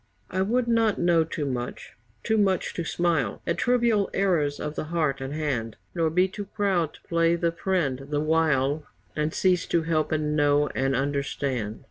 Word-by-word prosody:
I 185 - 0
would 235 +5 +1
not 225 -3 +2
know 170 -2 +3
too 155 -2 -4
much 125 -3 -5 0.3
too 220 0 +1
much 190 -3 +1
to 170 - -3
smile 165 -9 0
At 170 +1 -1
trivial 235 -5 +2
errors 165 -7 +1
of 150 - -4
the 155 - -4
heart 155 -5 -1
and 135 +1 -4
hand, 130 -8 -2 0.2
Nor 165 -2 +1
be 180 +4 +3
too 200 +2 -7
proud 190 -6 0
to - - -18
play 165 0 +2
the 170 0 0
friend 165 -7 -1
the 145 -1 0
while, 155 -2 +1 0.3
And 150 +1 0
cease 180 -1 +1
to 170 - +1
help 160 -1 0
and 150 -1 0
know 145 -1 +3
and 135 0 0
understand. 135 -5 -2
160 Hz, 180 wpm, -26 LUFS, 145-185 Hz, 0.3 s, know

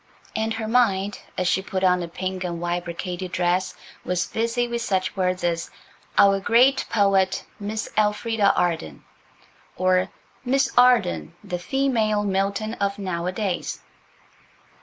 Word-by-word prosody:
And 220 0 -1
her 225 -1 -4
mind 205 -4 +2 0.2
as 185 - 0
she 185 - +2
put 190 -1 -3
on 180 -1 +4
a 170 - -4
pink 185 +2 -4
and 170 -2 -3
white 175 0 -2
brocaded 180 +1 -5
dress, 180 +1 0 0.3
was 180 -1 0
busy 230 +2 -1
with 235 0 -3
such 190 -4 -1
words 185 -1 0
as 170 -1 -1 0.5
"Our 195 0 +6
great 250 +7 +4
poet, 195 -3 +2
Miss 215 +2 -3
Elfrida 210 0 +2
Arden," 160 - -1 0.7
or 185 0 +2 0.3
"Miss 265 +2 +1
Arden, 240 - +3
the 180 - -4
female 225 -2 +1
Milton 200 +2 -1
of 200 0 0
nowadays." 185 0 -3
195 Hz, 135 wpm, -24 LUFS, 180-220 Hz, 0.7 s, Our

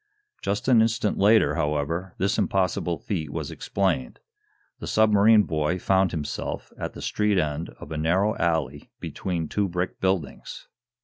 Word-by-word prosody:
Just 100 +4 -2
an 120 -4 +6
instant 110 -2 0
later, 105 +3 +5
however, 80 +3 -2
this 100 +2 0
impossible 90 -3 0
feat 80 -8 -4
was - - -4
explained. 100 +7 -1 0.6
The - - -6
submarine 110 0 +5
boy 80 +1 -1
found 95 +1 +2
himself 75 -4 -5
at - - -5
the - - -9
street 105 -2 +1
end 75 -1 -1
of - - -10
a 80 - -3
narrow 95 +7 +2
alley 80 -5 -1
between 85 -4 -3
two 100 +4 0
brick 90 0 -3
buildings. 95 -6 -2
95 Hz, 145 wpm, -25 LUFS, 80-105 Hz, 0.6 s, an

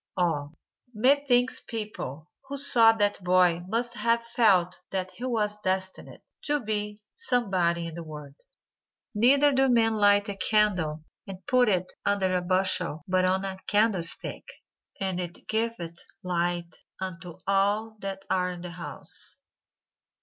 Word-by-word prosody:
Ah! 160 -5 0 0.5
methinks 255 +1 +2
people 200 - -6 0.2
who 280 +1 -5
saw 235 -5 +6
that 205 -3 -1
boy 180 -1 +3
must 235 +4 -2
have 235 0 +1
felt 200 -7 +2
that 185 -1 -3
he 235 +7 -7
was 210 -4 -1
destined 190 0 -3 0.2
to 295 0 0
be 210 -3 -3
somebody 190 - 0
in 165 - -6
the 170 - -7
world. 150 -3 -10 0.8
"Neither 275 +7 +5
do 270 0 +2
men 225 -2 +3
light 205 -1 +4
a 200 - -4
candle 185 -8 +2 0.2
and 190 -1 -9
put 250 -2 +3
it 185 -2 -1
under 190 -2 +1
a 180 - +1
bushel 180 -3 +1
but 185 0 +2
on 190 +1 0
a 190 -1 -5
candlestick; 205 -5 +2 0.5
and 190 -2 -2
it 175 -1 -7
giveth 220 -7 -2 0.3
light 175 -1 -2 0.2
unto 180 -2 -7
all 205 +3 +1
that 195 -1 -6
are 180 -1 0
in 180 -1 -7
the 175 0 -7
house." 165 -5 -9
195 Hz, 140 wpm, -27 LUFS, 180-225 Hz, 0.8 s, saw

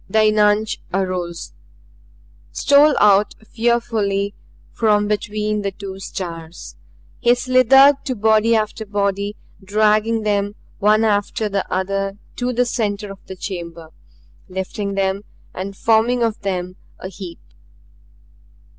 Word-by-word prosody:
The 215 +2 +3
eunuch 215 0 +3 0.2
arose, 180 - -3 1.0
stole 285 +1 +4
out 205 0 +4 0.2
fearfully 220 -4 0 0.4
from 210 -2 +2
between 210 0 -1
the 200 - -1
two 195 0 -8
stars. 170 -3 -7 0.4
He 240 +1 +4
slithered 260 +3 +5
to 260 -3 -2
body 220 +1 +3
after 220 0 -1
body, 200 0 -2 0.3
dragging 215 +2 +2
them 205 -1 0 0.2
one 215 +2 +4
after 210 0 0
the 200 -1 -3
other 195 +1 -2 0.2
to 250 0 -1
the 250 0 +1
center 210 -4 -2
of 195 - -12
the 190 - -7
chamber, 170 -4 -7 0.6
lifting 195 +2 -4
them 195 0 0 0.3
and 195 +1 -6
forming 230 +2 +2
of 225 -2 -1
them 185 -2 -3 0.2
a - - -7
heap. 185 -2 -9
205 Hz, 120 wpm, -20 LUFS, 195-220 Hz, 1.0 s, slithered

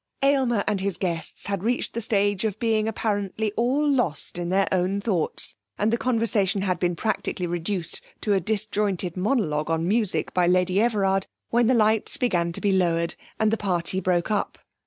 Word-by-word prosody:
Aylmer 260 -6 +3
and 205 -2 0
his 195 -2 -2
guests 170 -4 -3
had 200 -3 -2
reached 245 +3 0
the 235 - -3
stage 205 -2 +1
of 215 -2 -1
being 220 -1 +1
apparently 210 -1 -1
all 255 +7 +1
lost 245 - 0
in 175 0 -3
their 195 +1 +2
own 185 +2 +1
thoughts, 195 -6 0 0.2
and 215 +2 +1
the - - +3
conversation 215 -5 +1
had 185 -2 0
been 175 -1 0
practically 195 -2 -2
reduced 175 0 -2 0.2
to 210 - +1
a 195 - +3
disjointed 200 -2 -1
monologue 180 - 0
on 165 +1 0
music 210 0 0
by 180 -1 +2
Lady 180 +2 +3
Everard, 195 -4 +1 0.2
when 240 0 +3
the 255 - +4
lights 220 -1 +2
began 175 -8 +1
to - - -5
be 205 - +2
lowered, 170 -3 +1 0.3
and 215 -1 +3
the 225 - +1
party 185 -2 -1
broke 180 +1 0
up. 210 - -1
200 Hz, 180 wpm, -25 LUFS, 180-220 Hz, 0.3 s, the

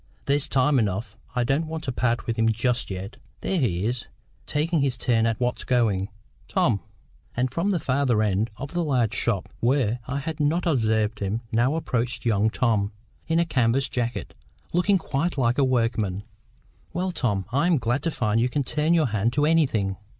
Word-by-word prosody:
There's 145 +1 +2
time 135 0 +3
enough. 105 0 -2 0.2
I 125 - +2
don't 140 +6 0
want 160 0 -5
to 135 - -2
part 120 -1 0
with 115 - -1
him 115 0 +2
just 120 +3 +1
yet. 95 +2 -6 0.2
There 190 - 0
he 95 - 0
is, 120 +2 -2 0.4
taking 155 +1 +1
his 135 -3 0
turn 115 -2 +2
at 115 -1 -1
what's 125 0 -1
going. 110 -6 +1 0.4
Tom!" 175 - +2 0.6
And 125 0 +1
from 170 +8 0
the 185 -4 +1
farther 130 -5 +1
end 105 +2 +1
of 140 +3 -7
the 175 0 0
large 125 -8 +1
shop, 105 -5 0
where 120 -2 +1
I 135 +2 -2
had 150 +2 -4
not 150 +4 +1
observed 110 -7 +1
him, 100 +3 -2
now 120 +6 +2
approached 125 -6 -2
young 110 -1 +3
Tom, 110 -4 +1 0.4
in 165 - +1
a 170 - +3
canvas 130 -2 +1
jacket, 120 -1 -3 0.4
looking 185 +3 +3
quite 165 0 -2
like 120 0 +2
a - - +5
workman. 115 -6 0 0.7
"Well, 185 +1 -1
Tom, 105 - -1
I 145 +7 +2
am 175 -3 +4
glad 120 +2 0
to 165 - 0
find 115 -7 0
you 125 - +2
can 145 +2 0
turn 150 +5 +1
your 160 -2 +3
hand 110 +2 0
to 145 +1 +2
anything." 120 - +2
125 Hz, 190 wpm, -25 LUFS, 110-145 Hz, 0.7 s, a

